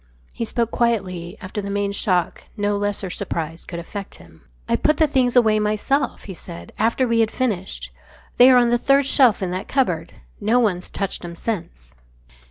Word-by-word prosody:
He 230 - -3
spoke 230 0 -1
quietly. 190 -6 -1
After 195 +2 -5
the 200 - -5
main 200 0 -1
shock 185 -4 0
no 205 0 0
lesser 200 -2 -2
surprise 165 0 -4
could 170 - -7
affect 195 +4 -7
him. 80 -1 -17 0.3
"I - - +2
put 305 -1 +2
the 315 - +5
things 260 -4 +1
away 220 -3 +5
myself," 215 +6 0
he 195 - -7
said, 85 - -10
"after 230 +4 +2
we 230 -1 +2
had 225 -1 +3
finished. 210 -8 -3 0.5
They 250 +1 +8
are 255 - +7
on 240 -1 +4
the 240 - +3
third 275 +1 +3
shelf 255 -7 +4
in 180 - -2
that 185 +2 -4
cupboard. 180 - 0 0.3
No 220 +4 +2
one's 190 -7 0
touched 195 -2 -3
'em 170 -1 -7
since." 65 - -5
205 Hz, 185 wpm, -22 LUFS, 180-240 Hz, 0.5 s, They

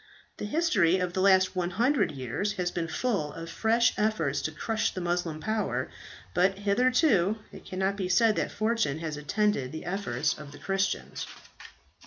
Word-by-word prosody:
"The - - -4
history 210 - +3
of 180 -1 -2
the 185 - 0
last 190 -1 +4
100 200 - +1
years 140 - -2
has 180 -3 -2
been 170 -2 -2
full 190 -5 -1
of 165 0 -7
fresh 230 +2 +3
efforts 160 -10 +1
to 155 - -2
crush 220 +7 -1
the - - -5
Moslem 175 -3 -1
power, 190 - -1 0.4
but 190 +2 +2
hitherto 215 - +3
it - - -12
cannot 190 +1 -1
be 185 -2 -2
said 215 +4 +4
that - - 0
fortune 215 -9 0
has 160 -2 -4
attended 150 -2 0
the 160 - -7
efforts 160 -6 -1
of 145 -1 -10
the - - -11
Christians. 195 0 -2
190 Hz, 165 wpm, -28 LUFS, 160-215 Hz, 0.4 s, last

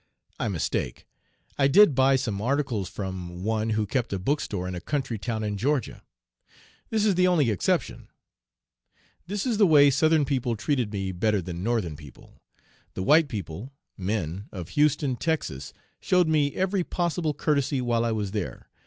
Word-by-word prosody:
I - - -1
mistake. - - -2 0.5
I 135 - +5
did 180 +3 +6
buy 135 +1 +4
some 110 -7 -2
articles 125 -5 -1
from 90 -2 -6
one 110 +1 0
who 110 -1 0
kept 120 +3 -2
a 100 - -1
book 140 +11 0
store 90 -3 -4
in 90 - -4
a 90 - -5
country 130 - -2
town 110 0 -3
in 105 -1 -2
Georgia. 140 +5 -1 0.9
This 220 -1 +1
is 205 - +4
the 180 0 +3
only 155 -10 +3
exception. 100 - -1 1.2
This 205 +4 -3
is 230 -4 0
the 205 - +6
way 145 -3 +6
Southern 155 +2 +3
people 125 -4 -1
treated 120 0 -1
me 95 -2 -3
better 105 +3 +1
than 90 -1 -6
Northern 105 -7 -1
people. 75 -3 -15 0.5
The 95 - -3
white 155 - +5
people 105 - -6 0.2
(men) 95 -1 -3
of 90 -3 -7
Houston, 145 - +1
Texas, 95 - -2 0.3
showed 180 -2 +2
me 150 -3 +1
every 190 0 0
possible 170 -3 -1
courtesy 140 -2 0
while 120 -2 +1
I 115 - 0
was 105 -3 -2
there. 105 -3 -5
120 Hz, 170 wpm, -26 LUFS, 100-150 Hz, 1.2 s, did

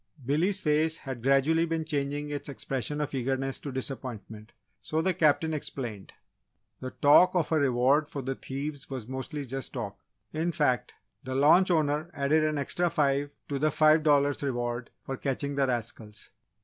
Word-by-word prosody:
Billy's 170 +9 +2
face 155 0 +1
had 130 -4 -7
gradually 140 +6 +3
been 165 -1 -2
changing 145 0 -2
its 145 0 -4
expression 135 +1 -4
of 150 -1 -3
eagerness 135 +1 -1
to 140 - -6
disappointment, 120 -5 -6 0.3
so 155 - -2
the 185 +3 +1
Captain 155 0 +2
explained: 120 -9 -5 0.7
"The 130 - -5
talk 165 +8 +5
of 170 -3 +1
a 160 - +3
reward 135 +2 +3
for 140 -2 -6
the 135 +1 -2
thieves 140 +2 -6
was 130 -5 -6
mostly 135 +3 -5
just 135 +1 -6
talk! 100 -6 -5 0.3
In 165 +2 -1
fact, 130 -6 0 0.3
the 130 0 -4
launch 155 +7 +5
owner 155 -1 +1
added 150 +2 +2
an 155 -1 0
extra 175 +5 0
five 145 -1 0
to 140 -1 -2
the 155 +2 +3
five 155 +1 +4
dollars 145 -2 +3
reward 120 -3 -2 0.2
for 135 - -4
catching 140 +1 -2
the 140 -1 +1
rascals. 115 -3 -5
140 Hz, 165 wpm, -28 LUFS, 130-155 Hz, 0.7 s, talk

